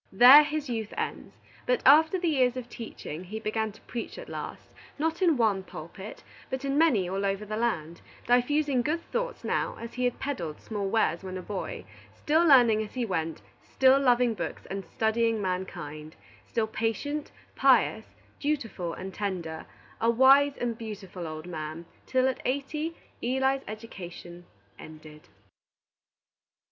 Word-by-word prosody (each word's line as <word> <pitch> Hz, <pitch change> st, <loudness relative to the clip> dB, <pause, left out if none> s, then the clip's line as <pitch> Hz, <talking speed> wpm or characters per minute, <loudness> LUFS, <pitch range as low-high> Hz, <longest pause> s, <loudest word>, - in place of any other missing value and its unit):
There 250 Hz, +9 st, +10 dB
his 300 Hz, 0 st, -3 dB
youth 225 Hz, -4 st, -4 dB
ends; -, -, -4 dB, 0.3 s
but -, -, +1 dB
after 315 Hz, +6 st, +7 dB
the 355 Hz, -1 st, -1 dB
years 255 Hz, -5 st, +2 dB
of 250 Hz, -2 st, -5 dB
teaching 180 Hz, -8 st, -7 dB
he 215 Hz, +4 st, -6 dB
began 220 Hz, 0 st, -2 dB
to 210 Hz, -, -18 dB
preach 235 Hz, -, -6 dB
at -, -, -9 dB
last, -, -, -7 dB, 0.2 s
not 320 Hz, +4 st, -1 dB
in 335 Hz, -6 st, +4 dB
one 215 Hz, -5 st, +2 dB
pulpit, 190 Hz, +3 st, -10 dB, 0.3 s
but 260 Hz, +1 st, -3 dB
in 275 Hz, 0 st, 0 dB
many 270 Hz, -, +3 dB
all 195 Hz, +2 st, -2 dB
over 195 Hz, +1 st, -1 dB
the 215 Hz, +1 st, -4 dB
land, 170 Hz, -8 st, -2 dB, 0.2 s
diffusing 260 Hz, +2 st, +2 dB
good 325 Hz, +7 st, -1 dB
thoughts -, -, -3 dB
now -, -, -1 dB
as 230 Hz, 0 st, -7 dB
he 250 Hz, 0 st, -1 dB
had 245 Hz, -, 0 dB
peddled 175 Hz, -, -4 dB
small 205 Hz, -3 st, -3 dB
wares 195 Hz, -5 st, +1 dB
when 185 Hz, 0 st, -5 dB
a -, -, -5 dB
boy; 200 Hz, -1 st, -5 dB, 0.3 s
still 315 Hz, +3 st, +2 dB
learning 245 Hz, -8 st, +6 dB
as 215 Hz, +2 st, -7 dB
he 250 Hz, -2 st, 0 dB
went, 165 Hz, -5 st, -3 dB, 0.2 s
still 265 Hz, +1 st, +4 dB
loving 245 Hz, -3 st, +3 dB
books 185 Hz, -, -5 dB
and 195 Hz, 0 st, -3 dB
studying 225 Hz, 0 st, +1 dB
mankind, 160 Hz, -5 st, -4 dB, 0.3 s
still 225 Hz, -2 st, 0 dB
patient, 230 Hz, +7 st, -2 dB, 0.3 s
pious, -, -, +4 dB, 0.3 s
dutiful, 225 Hz, -, -2 dB
and 190 Hz, +1 st, -7 dB
tender, 180 Hz, -6 st, -4 dB, 0.3 s
a 230 Hz, -, +3 dB
wise 270 Hz, +4 st, +5 dB
and 235 Hz, -2 st, -3 dB
beautiful 195 Hz, -6 st, -7 dB
old 155 Hz, 0 st, -7 dB
man, 160 Hz, -1 st, -6 dB, 0.2 s
till, 260 Hz, 0 st, +2 dB
at 260 Hz, -, -2 dB
eighty, 300 Hz, +5 st, -2 dB, 0.3 s
Eli's 265 Hz, +2 st, +1 dB
education 175 Hz, -5 st, -9 dB, 0.3 s
ended. 155 Hz, -1 st, -12 dB
225 Hz, 155 wpm, -28 LUFS, 190-270 Hz, 0.3 s, There